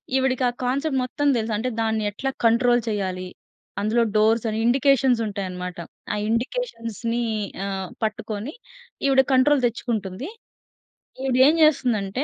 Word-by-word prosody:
ఈవిడకి 260 -1 +1
ఆ - - -3
కాన్సెప్ట్ 270 +3 0
మొత్తం 290 +3 -2
దెలుసు 225 -1 -1
అంటే 245 +4 -1
దాన్ని 220 -1 0
ఎట్లా 270 +7 -3 0.2
కంట్రోల్ 240 +1 +4
చెయ్యాలి? 190 -4 -2 0.6
అందులో 220 +3 +2
డోర్స్ 220 +2 +3
అని 215 - -2
ఇండికేషన్స్ 260 0 +3
ఉంటాయనమాట. 185 -3 -5 0.4
ఆ - - -1
ఇండికేషన్స్‌ని 230 - -2 0.4
ఆహ్, 190 -2 -4
పట్టుకొని 215 +4 -3 0.5
ఈవిడ 265 -1 +5
కంట్రోల్ 265 +2 +4
తెచ్చుకుంటుంది. 230 - -4 0.9
ఈవిడ 265 -2 0
ఏం 310 - +4
జేస్తుందంటే 250 -7 +2
230 Hz, 125 wpm, -23 LUFS, 210-265 Hz, 0.9 s, ఈవిడ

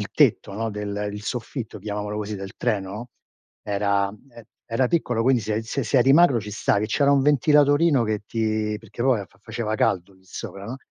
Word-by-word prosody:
il - - -4
tetto, - - +3
no, 110 +2 -2
del 105 0 -3
il 105 0 -7
soffitto 115 0 -5
chiamiamolo 105 +1 -4
così 105 0 -4
del 95 0 -8
treno, 105 0 -2 0.5
era 100 -1 +1
ehm, 115 +3 -14 0.2
era 115 +2 +1
piccolo 120 -9 0
quindi 125 -2 +3
se 110 +1 -1
se 120 +3 -3
eri 130 +2 +5
magro 145 -6 +5
ci 105 0 -7
stavi 105 0 +1
e - - -2
c'era 140 +5 +3
un 140 - +4
ventilatorino 145 0 +4
che 110 -2 -2
ti 110 -1 -1
perché 115 +1 -7
poi 125 -5 +2
fa 95 - -27
faceva 110 0 -3
caldo 95 -2 0
lì 95 0 -26
sopra, 100 0 -8
no, 120 +5 -5
110 Hz, 195 wpm, -24 LUFS, 105-125 Hz, 0.5 s, eri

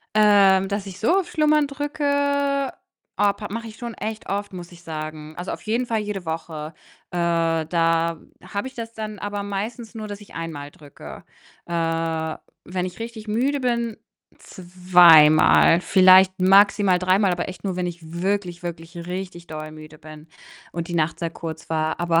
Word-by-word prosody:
Ähm, 200 -3 +5
dass 200 0 -3
ich 190 -2 -9
so 340 - +2
auf 350 - -7
Schlummern 305 -2 +2
drücke, 285 -1 0 0.4
oh, 205 -1 +3
pa 210 +1 -8
mache 230 +2 -5
ich 215 - -12
schon 235 -1 -6
echt 220 0 -6
oft, 200 0 -3
muss 175 -1 -9
ich 175 - -15
sagen. 155 -1 -7
Also, 180 +2 -5
auf - - -7
jeden 230 +3 -1
Fall 225 -2 -1
jede 205 -3 -5
Woche. 160 -1 -5 0.4
Äh, 180 - -4 0.5
da 165 0 +1 0.3
habe 200 +5 -4
ich 265 - -8
das 230 -1 -7
dann 215 -2 -6
aber 205 0 -4
meistens 220 +4 -5
nur, 215 -1 -6
dass 205 0 -7
ich 205 - -15
einmal 155 -4 -6
drücke. 145 -2 -12 0.4
Äh, 165 -1 -2 0.3
wenn 180 0 -3
ich 180 - -9
richtig 225 -1 -8
müde 265 +6 0
bin, 235 -3 -1 0.4
zweimal, 175 -3 +5
vielleicht 185 0 +5
maximal 195 0 +5
dreimal, 185 +2 +2
aber 175 0 -2
echt 185 - -9
nur, 190 -3 -3
wenn 180 -1 -1
ich 175 -1 -6 0.2
wirklich, 190 -3 -2
wirklich 170 0 -7
richtig 180 -1 -6
doll 155 0 -7
müde 155 0 -12
bin 155 0 -13 0.4
und 170 +1 -5
die 175 - -5
Nacht 160 0 0
sehr 170 -1 -2
kurz 160 -1 -8
war. 160 +1 -1
Aber 170 -1 +2
185 Hz, 175 wpm, -23 LUFS, 165-215 Hz, 0.5 s, Ähm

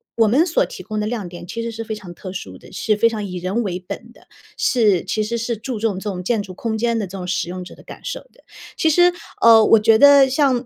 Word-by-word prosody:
“我 225 -2 +3
们 275 +11 +3
所 330 - +1
提 185 - -10
供 215 +1 -4
的 210 - -1
亮 215 -5 -4
点 175 0 -10
其 230 +4 -5
实 230 - -4
是 225 0 -6
非 220 -1 -5
常 185 -4 -10
特 185 +2 -9
殊 95 - -7
的， - - -16
是 215 -2 0
非 230 +2 +3
常 215 -2 -4
以 185 -2 -6
人 190 +7 -2
为 180 -3 -3
本 200 +5 -9
的， - - -22 0.3
是 210 -8 +2
其 215 - -1
实 235 +2 -3
是 230 0 -3
注 230 +1 -5
重 220 -3 0
这 210 - -7
种 185 -3 -4
建 220 +1 0
筑 190 - -10
空 220 +3 -3
间 235 0 0
的 205 - -3
这 190 +2 -8
种 180 - -6
使 180 -1 -2
用 185 0 -6
者 180 - -11
的 - - -16
感 - - -12
受 - - -4
的。” - - -25 0.3
其 320 - +2
实， 350 +3 +5 0.3
呃， 225 -1 +7
我 225 - +6
觉 220 +1 +4
得 280 0 +7
像 260 -2 +1
220 Hz, 300 characters per minute, -20 LUFS, 190-235 Hz, 0.3 s, 呃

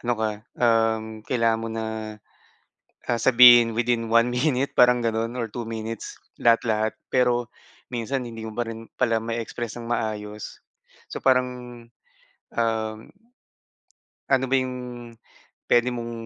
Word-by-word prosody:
ano 120 - 0
ka, 110 0 0 0.3
um, 115 -2 +2 0.2
kailangan 115 -2 +1
mo 115 - -4
na, 110 0 -4 1.2
ah, 120 -1 0
sabihin 120 -2 +8
within 115 0 -1
1 115 +1 +5
minute 135 +1 0
parang 125 0 +5
gano'n 115 +1 -2
or 115 - -1
2 120 +2 -6
minutes 115 -1 -6 0.2
lahat, 115 -1 +5
lahat. 110 -1 +1
Pero 125 -1 +1 0.4
minsan 125 +2 -3
hindi 115 -1 -8
mo 110 - -6
pa 120 +2 -3
rin 115 0 -8
pala 115 -3 +1
ma-e-express 115 0 -4
ng 115 - -8
maayos. 105 -3 -4 0.5
So - - -7
parang, 125 -1 +3 1.0
um, 110 -2 -1 1.3
ano 135 -1 +3
ba 130 0 -1
yung 130 0 -4 0.9
puwede 120 +1 +3
mong, 120 -1 -5
115 Hz, 135 wpm, -24 LUFS, 110-125 Hz, 1.3 s, sabihin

